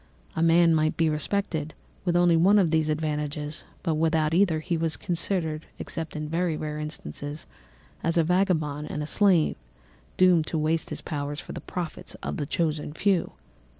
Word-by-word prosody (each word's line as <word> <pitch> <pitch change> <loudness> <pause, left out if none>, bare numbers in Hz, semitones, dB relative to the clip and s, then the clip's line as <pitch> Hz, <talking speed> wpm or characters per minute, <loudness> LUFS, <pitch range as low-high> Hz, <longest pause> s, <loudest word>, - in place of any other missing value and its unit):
A 160 - -1
man 165 0 +5
might 155 0 +1
be 165 -1 +3
respected 155 -1 -1 0.3
with 175 -1 +1
only 175 -1 +5
one 190 +6 +5
of 180 -6 +3
these 160 -1 +2
advantages, 150 0 -2 0.2
but 165 - +1
without 160 0 +1
either 170 -3 +3
he 170 +2 -2
was 165 -1 -1
considered, 170 -3 -2
except 160 -1 -6
in 150 0 -3
very 165 0 0
rare 150 0 -4
instances, 150 -1 -6 0.6
as 165 +1 0
a 165 - +5
vagabond 155 -5 +1
and 150 - -3
a - - -3
slave, 180 -1 +3 0.6
doomed 180 -4 +5
to 160 - -2
waste 155 +1 0
his - - -3
powers 145 -1 -4
for - - -8
the - - -6
profits 175 -3 -6
of - - -3
the 145 - -3
chosen 155 -2 -1
few! 190 +1 +1
160 Hz, 175 wpm, -26 LUFS, 150-175 Hz, 0.6 s, man